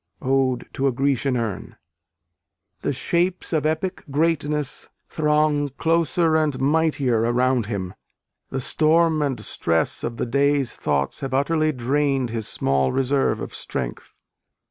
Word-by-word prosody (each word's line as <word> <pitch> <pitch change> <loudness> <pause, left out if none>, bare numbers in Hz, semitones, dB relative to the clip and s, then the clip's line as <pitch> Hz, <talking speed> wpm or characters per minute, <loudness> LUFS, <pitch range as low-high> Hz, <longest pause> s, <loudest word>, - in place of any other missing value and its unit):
Ode 130 -1 +1
to 135 - 0
a - - +3
Grecian 135 0 0
Urn. 115 -5 -4 1.1
The - - -1
"shapes 175 +7 0
of 155 -1 +2
epic 170 +4 -2
greatness" 150 -1 -1 0.2
throng 150 -1 +1
closer 165 0 +2
and 155 -4 +1
mightier 140 -4 +2
around 120 0 +1
him. 95 -4 -4 0.6
The 135 - -3
storm 160 +3 +3
and 135 -5 -1
stress 80 -5 0
of 115 - -3
the - - -1
day's 140 +1 +1
thoughts 70 -2 -1
have 135 -2 -3
utterly 155 +3 +2
drained 135 -1 0
his 115 -2 -3
small 70 -1 +1
reserve 135 +1 +1
of - - -6
strength. - - -6
140 Hz, 130 wpm, -23 LUFS, 120-155 Hz, 1.1 s, a